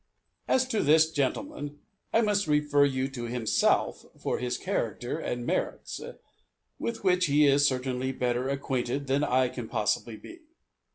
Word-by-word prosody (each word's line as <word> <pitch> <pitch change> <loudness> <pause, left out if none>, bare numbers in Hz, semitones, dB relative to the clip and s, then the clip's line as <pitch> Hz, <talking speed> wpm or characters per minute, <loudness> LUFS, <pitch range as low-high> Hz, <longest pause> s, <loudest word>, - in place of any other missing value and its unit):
As 260 0 +2
to 220 -4 +1
this 160 +2 +4
gentleman, 145 - -2 0.3
I 225 - +4
must 205 -4 +1
refer 150 -1 +3
you 130 -1 0
to 125 -3 -6
himself 120 -2 +1 0.2
for - - -2
his 125 0 -2
character 125 - -2
and 120 -6 -3
merits, - - -2 0.8
with 230 -2 -4
which 180 -2 +3
he 145 +1 +4
is 140 0 +5
certainly 130 0 -1
better 125 0 -1
acquainted 135 0 -2
than 135 +2 +1
I 130 -2 +3
can 125 -2 -7
possibly 110 +2 -1
be. 335 - -12
140 Hz, 150 wpm, -28 LUFS, 125-160 Hz, 0.8 s, is